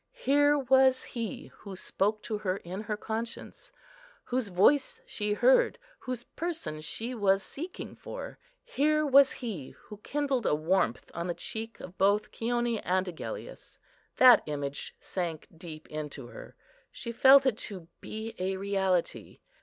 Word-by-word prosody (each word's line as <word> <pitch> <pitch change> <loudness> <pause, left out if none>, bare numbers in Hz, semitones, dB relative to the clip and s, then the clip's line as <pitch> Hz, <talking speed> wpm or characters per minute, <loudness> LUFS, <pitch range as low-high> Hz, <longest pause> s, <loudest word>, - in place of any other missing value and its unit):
Here 290 - +4
was 265 -1 +4
He 230 -3 -6
who 200 -2 -8
spoke 210 +3 -1
to 215 -2 -3
her 190 -2 -1
in 185 +2 -6
her 210 -1 -3
conscience; 225 - -6 0.5
whose 250 -2 -1
Voice 200 +10 +3
she 210 -1 -2
heard, - - +4 0.2
whose 255 -2 -5
Person 325 - -5
she 225 +10 -5
was 195 -4 +2
seeking 340 +6 -7
for. - - -8 0.2
Here 305 - +1
was 280 -1 +6
He 205 - -6
who 210 - -12
kindled 275 +1 -1
a - - +3
warmth 155 -6 0
on 170 +1 -3
the 175 - -2
cheek 225 0 -6
of 185 +1 -11
both 205 +2 +3
Chione 240 -1 -1
and 185 +1 +1
Agellius. 180 - -8 0.4
That 255 -2 +8
image 145 -1 -4
sank 170 -4 -4
deep 160 -2 -10
into 150 -3 -6
her; - - -11 0.4
she 235 - -6
felt 270 +3 +7
it 245 -5 +1
to 185 -5 -8
be 220 +1 -6
a 190 +1 -1
reality. 190 -3 -1
215 Hz, 145 wpm, -29 LUFS, 185-260 Hz, 0.5 s, That